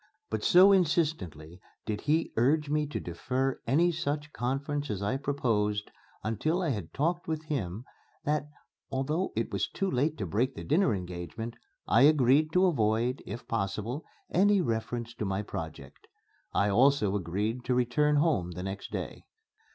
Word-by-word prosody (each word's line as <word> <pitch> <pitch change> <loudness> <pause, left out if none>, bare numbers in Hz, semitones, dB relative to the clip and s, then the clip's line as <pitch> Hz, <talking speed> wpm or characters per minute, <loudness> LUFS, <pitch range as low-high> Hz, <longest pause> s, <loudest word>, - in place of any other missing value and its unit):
But - - -2
so 190 +2 +7
insistently 145 - 0 0.2
did 105 -2 -3
he 155 +3 +1
urge 145 +5 +2
me 150 0 +1
to 150 - -4
defer 130 +10 -2
any 165 +8 +4
such 155 -2 -3
conference 140 +4 -2
as 100 -1 -3
I 105 +6 0
proposed 110 -7 0 0.3
until 155 - 0
I 165 - 0
had 105 - -3
talked 170 +5 -1
with 160 -1 -2
him 120 - -3 0.4
that, 150 -1 0 0.4
although 150 +7 -1
it - - -1
was - - 0
too 195 -1 -2
late 145 +5 +1
to 100 - -3
break 120 - 0
the - - -6
dinner 160 - +2
engagement, 90 +5 -6 0.3
I 115 - +4
agreed 145 +1 +5
to 185 +1 +5
avoid, 120 -5 +1
if 120 0 -7
possible, 110 +6 -2 0.3
any 200 +3 +4
reference 120 -4 -2
to 115 - -5
my 95 +1 -1
project. 80 -9 -8 0.4
I 100 - +2
also 115 -1 +3
agreed 105 +6 -2
to 125 - +1
return 125 +5 +2
home 145 - +1
the 90 +2 -6
next 95 +1 -5
day. - - -5
125 Hz, 160 wpm, -29 LUFS, 105-150 Hz, 0.4 s, so